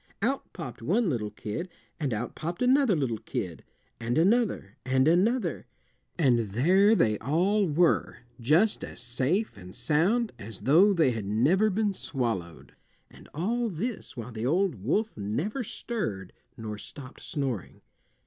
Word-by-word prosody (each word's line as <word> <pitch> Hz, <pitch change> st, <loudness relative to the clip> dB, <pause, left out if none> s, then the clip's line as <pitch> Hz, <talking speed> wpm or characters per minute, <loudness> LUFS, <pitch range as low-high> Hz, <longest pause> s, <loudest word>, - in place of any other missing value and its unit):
Out 270 Hz, +5 st, -1 dB
popped 130 Hz, -10 st, -8 dB
one 190 Hz, -, +1 dB
little 110 Hz, -5 st, -2 dB
kid, 135 Hz, -, -5 dB, 0.3 s
and 145 Hz, -4 st, -1 dB
out 115 Hz, +2 st, -3 dB
popped 170 Hz, +8 st, -4 dB
another 260 Hz, -4 st, +4 dB
little 125 Hz, -8 st, -1 dB
kid, 90 Hz, -5 st, -5 dB, 0.4 s
and 120 Hz, +2 st, -1 dB
another, 195 Hz, -, +2 dB
and 130 Hz, +2 st, +2 dB
another, 210 Hz, +10 st, +2 dB, 0.5 s
and 130 Hz, -8 st, +4 dB
there 170 Hz, -, +4 dB
they 110 Hz, -, +2 dB
all 180 Hz, -, +2 dB
were, 160 Hz, -3 st, +1 dB, 0.2 s
just 160 Hz, -, +3 dB
as -, -, -6 dB
safe 130 Hz, -, 0 dB
and 90 Hz, -1 st, -11 dB
sound 205 Hz, +10 st, +2 dB
as 110 Hz, -2 st, -7 dB
though 165 Hz, -, +5 dB
they 160 Hz, -9 st, +3 dB
had 110 Hz, -4 st, -4 dB
never 145 Hz, -, +3 dB
been 210 Hz, 0 st, 0 dB
swallowed. 115 Hz, -, -4 dB, 0.4 s
And -, -, -16 dB
all 230 Hz, +9 st, 0 dB
this 210 Hz, -, -5 dB
while 120 Hz, +1 st, -6 dB
the 110 Hz, -1 st, -5 dB
old 160 Hz, -, +1 dB
wolf 215 Hz, -, 0 dB
never 145 Hz, -, -2 dB
stirred 110 Hz, -, -4 dB, 0.2 s
nor 110 Hz, -2 st, -6 dB
stopped 135 Hz, 0 st, -11 dB
snoring. 135 Hz, -, -4 dB
150 Hz, 145 wpm, -28 LUFS, -, 0.5 s, though